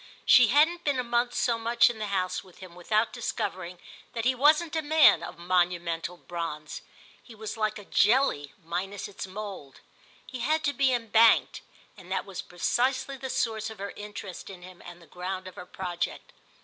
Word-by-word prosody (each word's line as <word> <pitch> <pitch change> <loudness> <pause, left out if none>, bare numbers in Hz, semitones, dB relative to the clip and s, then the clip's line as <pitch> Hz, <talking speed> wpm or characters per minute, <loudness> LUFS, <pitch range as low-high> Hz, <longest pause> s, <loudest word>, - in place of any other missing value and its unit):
She 250 -2 +7
hadn't 315 +8 +3
been 285 -3 +1
a 250 - 0
month 240 +1 0
so 235 -2 +1
much 235 +1 +4
in 240 -3 -3
the 210 - -3
house 185 -2 -1
with 185 -2 -19
him 185 -2 -12
without 215 +6 0
discovering 185 -6 -4 0.4
that 230 -1 -3
he 260 - +4
wasn't 305 +5 +3
a 320 - +1
man 310 +1 +5
of - - -8
monumental 175 -1 0
bronze. 165 -4 -6 0.4
He 230 - -14
was 215 -1 -6
like 215 -1 -1
a 205 - -11
jelly 210 - +2
minus 190 +4 -4
its 195 -1 -7
mould, 190 -8 -8 0.5
he 255 - -8
had 310 +6 0
to 285 - +1
be 270 0 +2
embanked; 230 -2 +4 0.3
and 185 -3 -14
that 190 - -1
was 195 -3 -6
precisely 260 +9 -1
the 265 0 -6
source 220 -3 -1
of 220 - -10
her 200 +1 -5
interest 205 -3 -8
in 185 -2 -11
him 185 0 -13
and 175 0 -12
the - - -16
ground 185 +2 -6
of 185 - -9
her 180 - -10
project. 180 -2 -5
210 Hz, 190 wpm, -27 LUFS, 180-245 Hz, 0.5 s, She